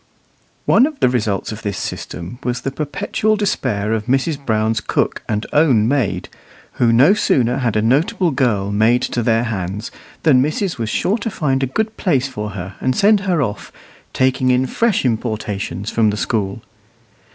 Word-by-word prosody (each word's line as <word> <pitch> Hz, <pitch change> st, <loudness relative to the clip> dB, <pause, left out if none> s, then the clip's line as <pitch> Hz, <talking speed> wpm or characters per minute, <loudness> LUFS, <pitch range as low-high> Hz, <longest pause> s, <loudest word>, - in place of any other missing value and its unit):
One 250 Hz, +5 st, +5 dB
of 305 Hz, -3 st, -8 dB
the -, -, +4 dB
results 105 Hz, -6 st, -1 dB
of 110 Hz, +1 st, -7 dB
this 100 Hz, -3 st, -3 dB
system 90 Hz, +8 st, -6 dB
was 125 Hz, 0 st, -2 dB
the 135 Hz, -, -3 dB
perpetual 200 Hz, +9 st, -1 dB
despair 120 Hz, -, -1 dB
of 110 Hz, 0 st, -2 dB
Mrs. 140 Hz, +3 st, 0 dB
Brown's 110 Hz, -2 st, 0 dB
cook -, -, -1 dB
and 105 Hz, -1 st, -1 dB
own 130 Hz, -8 st, +4 dB
maid, 130 Hz, -5 st, 0 dB, 0.5 s
who 120 Hz, -1 st, +5 dB
no 135 Hz, +11 st, +6 dB
sooner 125 Hz, -, +1 dB
had 120 Hz, -5 st, 0 dB
a 105 Hz, -, +2 dB
notable 155 Hz, +8 st, +2 dB
girl 110 Hz, -8 st, 0 dB
made 110 Hz, +4 st, +3 dB
to 120 Hz, -, -1 dB
their 115 Hz, 0 st, +2 dB
hands 105 Hz, -1 st, -4 dB, 0.3 s
than 140 Hz, -6 st, +5 dB
missus 155 Hz, -, -1 dB
was 110 Hz, -1 st, -2 dB
sure 205 Hz, -, 0 dB
to 220 Hz, -, -3 dB
find 135 Hz, -9 st, -1 dB
a 135 Hz, -, +1 dB
good 220 Hz, -, -2 dB
place 140 Hz, -8 st, +1 dB
for 105 Hz, -5 st, -5 dB
her 95 Hz, +2 st, -6 dB
and 130 Hz, 0 st, 0 dB
send 205 Hz, +1 st, +4 dB
her 180 Hz, -6 st, 0 dB
off, 105 Hz, -4 st, -5 dB, 0.4 s
taking 130 Hz, 0 st, +1 dB
in 125 Hz, +1 st, +3 dB
fresh 225 Hz, -, 0 dB
importations 105 Hz, -5 st, -2 dB
from 110 Hz, -2 st, +2 dB
the 105 Hz, -, -2 dB
school. 100 Hz, -3 st, -2 dB
125 Hz, 175 wpm, -18 LUFS, 110-145 Hz, 0.5 s, no